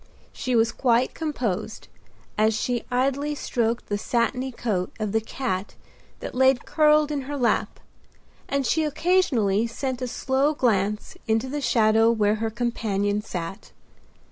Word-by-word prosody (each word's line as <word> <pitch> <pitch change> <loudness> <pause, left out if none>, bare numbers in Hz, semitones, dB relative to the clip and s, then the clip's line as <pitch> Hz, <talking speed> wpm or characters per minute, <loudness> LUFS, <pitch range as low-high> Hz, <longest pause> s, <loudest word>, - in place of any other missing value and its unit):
She 255 -1 -2
was 225 0 +3
quite 245 -1 +2
composed, 230 - -3 0.5
as 215 +1 +2
she 245 -2 -1
idly 275 +4 0
stroked 235 -4 -1
the 205 0 -2
satiny 250 +4 0
coat 210 -7 -2
of 215 -2 -2
the 220 +1 +1
cat 215 -4 -4 0.5
that - - -6
lay 265 +1 +5
curled 300 +3 +3
in 290 -2 -1
her 290 - -3
lap, 245 -3 0 0.7
and 275 -1 0
she 320 +6 +2
occasionally 285 - +2
sent 260 +2 -4
a 255 - -1
slow 270 +5 0
glance 210 -5 0
into 225 +3 +1
the 290 +2 -3
shadow 225 -2 +4
where 215 -2 +2
her 225 - 0
companion 210 -3 -1
sat. 180 -3 -7
235 Hz, 145 wpm, -24 LUFS, 215-270 Hz, 0.7 s, lay